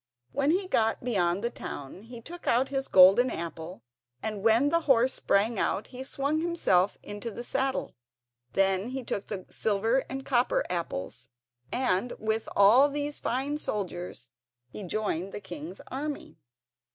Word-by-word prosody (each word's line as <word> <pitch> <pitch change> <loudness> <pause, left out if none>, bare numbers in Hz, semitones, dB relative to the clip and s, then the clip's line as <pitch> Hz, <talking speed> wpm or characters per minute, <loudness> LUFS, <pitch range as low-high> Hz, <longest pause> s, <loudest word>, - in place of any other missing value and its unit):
When 280 +1 +1
he 370 +4 +1
got 225 -10 +1
beyond 195 -5 +1
the 235 - -1
town 145 - -8
he 230 +2 -11
took 345 +8 -10
out 255 +3 +3
his 270 -1 -2
golden 195 +7 +7
apple, 165 - -6 0.4
and 215 -2 -3
when 230 +6 +4
the 335 - +3
horse 255 0 +5
sprang 210 +2 +1
out 205 - 0
he 255 +1 -6
swung 280 +3 -1
himself 205 - +2
into 205 +3 -6
the 235 +2 -7
saddle. 270 +1 -1 0.6
Then 195 +2 +2
he 265 0 -4
took 205 -3 -4
the 195 -3 -5
silver 220 +4 +1
and 270 - -4
the - - -18
copper 245 -2 +2
apples, 170 - -4 0.4
and 245 -2 +1
with 220 +1 -1
all 235 +8 +7
these 290 +1 -3
fine 275 +4 -1
soldiers 180 - -4 0.4
he 125 - -9
joined 195 -1 -2
the - - -4
king's 175 -2 -8
army. 290 +2 -5
225 Hz, 155 wpm, -28 LUFS, 195-265 Hz, 0.6 s, golden